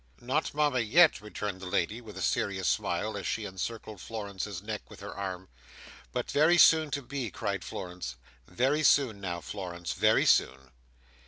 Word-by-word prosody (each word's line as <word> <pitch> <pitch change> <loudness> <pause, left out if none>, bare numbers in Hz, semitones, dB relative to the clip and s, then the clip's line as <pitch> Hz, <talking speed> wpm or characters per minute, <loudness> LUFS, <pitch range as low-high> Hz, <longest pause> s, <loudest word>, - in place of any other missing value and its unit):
"Not 130 +5 -1
Mama 145 -4 +2
yet," 150 - +5
returned 105 -2 -5
the 95 - -6
lady, 95 +6 -1
with 105 -4 -11
a 95 - -3
serious 95 +3 0
smile, - - 0
as - - -4
she - - -2
encircled 105 +1 -5
Florence's 100 -3 -5
neck 105 -1 -6
with - - -12
her 100 0 -7
arm. 95 -2 -5 0.6
"But - - -3
very 160 +4 +5
soon 160 -2 +6
to 140 -1 -3
be," 125 -2 -4
cried - - -3
Florence. 90 -9 -6 0.3
"Very 135 +11 +1
soon 130 -9 +3
now, 85 -3 -3
Florence: 90 -4 -5
very - - +3
soon." 65 0 +2
105 Hz, 165 wpm, -29 LUFS, 95-130 Hz, 0.6 s, soon